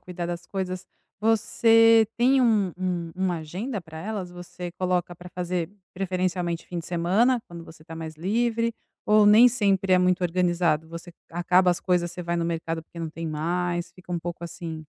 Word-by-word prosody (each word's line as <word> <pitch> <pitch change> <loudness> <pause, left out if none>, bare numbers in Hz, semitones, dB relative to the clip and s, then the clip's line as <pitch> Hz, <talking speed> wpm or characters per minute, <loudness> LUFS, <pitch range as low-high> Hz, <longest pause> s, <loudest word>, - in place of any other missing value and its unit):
cuidar 175 -1 -6
das 175 0 -5
coisas, 185 -2 -4 0.3
você 225 0 +5
tem 260 +3 +4
um 215 -6 +3
um 180 -2 -2
uma 185 -2 -1
agenda 190 - -5
para 160 -1 -11
elas? 195 -1 -5
Você 175 0 -8
coloca 180 -1 -1
para 175 +1 -11
fazer 180 -1 -3 0.2
preferencialmente 180 -2 -2
fim 175 - -5
de 165 - -7
semana, 200 +9 +2
quando 170 -1 -9
você 160 -1 -14
está 160 +1 -10
mais 160 -1 -7
livre, 230 +6 0 0.3
ou 210 0 +5
nem 220 +4 +8
sempre 195 -5 +1
é 185 - +6
muito 180 0 +2
organizado? 175 -3 +1
Você 170 +1 -9 0.2
acaba 180 +2 +3
as 175 - 0
coisas, 175 -2 +1
você 180 +1 -7
vai 170 0 -2
no 170 - 0
mercado 165 -1 -3
porque 170 +1 -14
não 165 -1 -4
tem 165 +1 -6
mais, 175 +3 -2
fica 180 -1 -16
um 175 - 0
pouco 175 0 -6
assim? 165 -2 -7
180 Hz, 185 wpm, -25 LUFS, 170-195 Hz, 0.3 s, nem